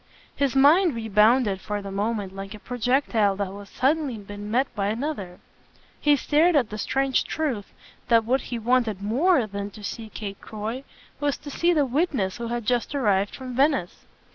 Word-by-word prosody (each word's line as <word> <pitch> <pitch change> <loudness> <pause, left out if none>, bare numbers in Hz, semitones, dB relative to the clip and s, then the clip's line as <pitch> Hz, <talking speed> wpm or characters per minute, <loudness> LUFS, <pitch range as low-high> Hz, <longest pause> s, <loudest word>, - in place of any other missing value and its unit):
His 275 -2 0
mind 305 +3 +5
rebounded 220 -1 +3
for 210 -1 -3
the 195 - -6
moment 200 -1 -2
like 195 +2 -7
a - - -11
projectile 245 -4 +1
that 200 +1 -1
has 200 0 -10
suddenly 280 -2 0
been 205 0 -8
met 250 +5 +2
by 200 -2 -1
another: 215 -6 -3 0.6
he 295 -1 +4
stared 310 +5 +3
at 250 -8 +2
the 215 - -5
strange 270 +4 +1
truth 260 -11 -3 0.4
that 230 -2 +4
what 260 +4 +1
he 240 - -5
wanted 230 -4 +1
MORE 265 - +3
than 200 -1 -5
to 210 +1 -13
see 220 +1 -6
Kate 200 -2 -7
Croy 220 +5 -5 0.4
was 290 -2 0
to 290 - -9
see 340 +5 +2
the 300 -4 +3
witness 260 - 0
who 235 0 -4
had 240 -1 -3
just 245 +4 0
arrived 205 -6 +1
from 255 -2 -7
Venice. 270 - +1
235 Hz, 180 wpm, -25 LUFS, 205-275 Hz, 0.6 s, mind